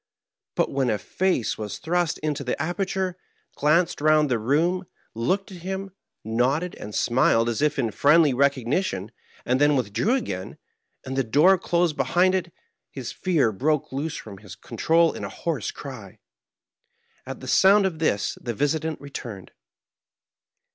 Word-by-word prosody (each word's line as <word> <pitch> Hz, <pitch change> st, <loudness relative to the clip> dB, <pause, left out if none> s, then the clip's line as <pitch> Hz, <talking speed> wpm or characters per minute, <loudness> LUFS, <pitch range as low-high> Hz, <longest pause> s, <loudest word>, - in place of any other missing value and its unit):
But -, -, +1 dB
when 135 Hz, -2 st, 0 dB
a 110 Hz, -, +1 dB
face 180 Hz, -, -1 dB
was 105 Hz, -2 st, -5 dB
thrust 170 Hz, 0 st, 0 dB
into 150 Hz, -2 st, -1 dB
the 125 Hz, -, -3 dB
aperture, 185 Hz, +3 st, -2 dB, 0.4 s
glanced 165 Hz, +3 st, +2 dB
round 155 Hz, -1 st, +4 dB
the 120 Hz, -, +2 dB
room, 165 Hz, -, +1 dB, 0.3 s
looked 185 Hz, -, -1 dB
at 180 Hz, -, -9 dB
him, 190 Hz, +2 st, -4 dB, 0.3 s
nodded 130 Hz, +10 st, 0 dB
and 105 Hz, 0 st, -8 dB
smiled 120 Hz, -2 st, +3 dB
as 120 Hz, +2 st, -1 dB
if 150 Hz, 0 st, +1 dB
in 120 Hz, -5 st, 0 dB
friendly 150 Hz, +4 st, +4 dB
recognition, 130 Hz, -, 0 dB, 0.3 s
and 130 Hz, +3 st, +1 dB
then 145 Hz, 0 st, +5 dB
withdrew 125 Hz, -, +1 dB
again, 95 Hz, -, -4 dB, 0.5 s
and 130 Hz, 0 st, -4 dB
the 135 Hz, -, +1 dB
door 150 Hz, +11 st, +5 dB
closed 170 Hz, -3 st, +1 dB
behind 185 Hz, +1 st, +3 dB
it, 180 Hz, -2 st, -1 dB, 0.4 s
his 130 Hz, -4 st, -6 dB
fear 160 Hz, -11 st, +1 dB
broke 145 Hz, +8 st, 0 dB
loose 145 Hz, +4 st, -3 dB
from 100 Hz, -3 st, -10 dB
his 100 Hz, -2 st, -11 dB
con 115 Hz, +1 st, -11 dB
trol 165 Hz, 0 st, +3 dB
in -, -, -6 dB
a -, -, -4 dB
hoarse 155 Hz, -, -3 dB
cry. 115 Hz, -9 st, -9 dB, 1.1 s
At -, -, -6 dB
the -, -, -8 dB
sound 195 Hz, +1 st, +5 dB
of 170 Hz, -5 st, -2 dB
this 100 Hz, -11 st, 0 dB
the 120 Hz, -2 st, -4 dB
visitant 155 Hz, +4 st, -1 dB
returned. 120 Hz, -9 st, -8 dB
145 Hz, 155 wpm, -24 LUFS, 120-175 Hz, 1.1 s, then